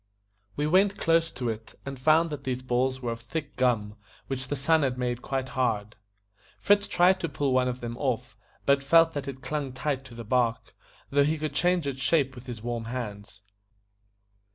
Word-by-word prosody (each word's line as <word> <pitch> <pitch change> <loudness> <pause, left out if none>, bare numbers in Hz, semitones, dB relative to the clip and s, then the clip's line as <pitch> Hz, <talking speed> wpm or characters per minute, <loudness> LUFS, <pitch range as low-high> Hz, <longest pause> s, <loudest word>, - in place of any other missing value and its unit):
We 145 - 0
went 190 +5 +3
close 165 0 +2
to 125 -2 -2
it, 110 0 -6
and 135 -1 -6
found 155 +4 +4
that 150 - -5
these 130 -1 -3
balls 130 +1 0
were 120 - -1
of 115 0 -6
thick 145 +4 -5
gum, 115 -5 +1 0.3
which 135 -1 -4
the 145 - -2
sun 160 +4 +3
had 130 -3 0
made 125 -1 -2
quite 130 -1 -3
hard. 115 -5 -1 0.6
Fritz 205 0 +3
tried 185 +2 +4
to 170 - -2
pull 140 -1 0
one 130 0 +3
of 125 0 -3
them 120 0 -4
off, 125 -4 -2 0.3
but 140 0 +4
felt 165 +3 +5
that 140 -1 -4
it 135 -1 -7
clung 145 -3 -2
tight 135 0 -2
to 120 - -11
the 115 - -7
bark, 115 -1 0 0.4
though 140 0 +4
he 155 +3 +1
could 155 -1 -3
change 175 +3 +2
its 135 -2 -3
shape 140 -5 +2
with 125 0 -12
his 115 -3 -7
warm 120 -1 -3
hands. 105 -4 -6
130 Hz, 200 wpm, -27 LUFS, 120-150 Hz, 0.6 s, felt